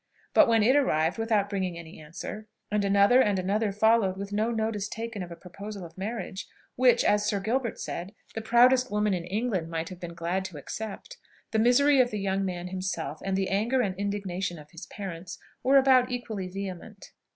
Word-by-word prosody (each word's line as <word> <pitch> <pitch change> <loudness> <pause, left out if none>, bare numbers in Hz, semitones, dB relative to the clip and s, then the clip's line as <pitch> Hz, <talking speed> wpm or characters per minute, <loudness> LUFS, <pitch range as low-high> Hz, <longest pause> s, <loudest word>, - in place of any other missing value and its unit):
But - - +7
when 225 -2 +4
it 255 +5 +4
arrived 175 - +2
without 220 -3 +1
bringing 190 -4 -2
any 165 -1 -10
answer, 175 +7 -8 0.2
and 210 -1 +1
another 200 +5 +5
and 205 -5 +2
another 200 +3 0
followed 210 -2 +3
with 200 +1 -6
no 215 +2 +1
notice 220 -3 -1
taken 225 -2 -5
of 180 - -6
a 170 - -8
proposal 195 +2 -8
of 165 - -13
marriage, 200 -1 -5 0.3
which, 245 -2 +4
as 205 0 +3
Sir 205 -1 0
Gilbert 230 +4 -1
said, 180 +5 -5 0.2
the 225 - -4
proudest 250 +3 +4
woman 210 -1 +1
in 175 -2 -3
England 195 -3 -2
might 165 0 -3
have 185 -2 -9
been 170 -2 -7
glad 170 +3 -1
to 185 -5 -7
accept, 220 - -7 0.3
the 220 - +1
misery 260 +4 +5
of 245 - +1
the 215 - -4
young 195 0 0
man 180 -1 -4
himself, 180 -4 -4
and 195 -1 -1
the 195 -1 0
anger 225 +7 +1
and 195 -5 -1
indignation 195 -3 -3
of 150 -1 -14
his 165 - -10
parents, 185 -2 -7 0.2
were 270 +2 +5
about 260 -2 +5
equally 225 -6 -4
vehement. 195 +2 -7
200 Hz, 195 wpm, -27 LUFS, 185-225 Hz, 0.3 s, But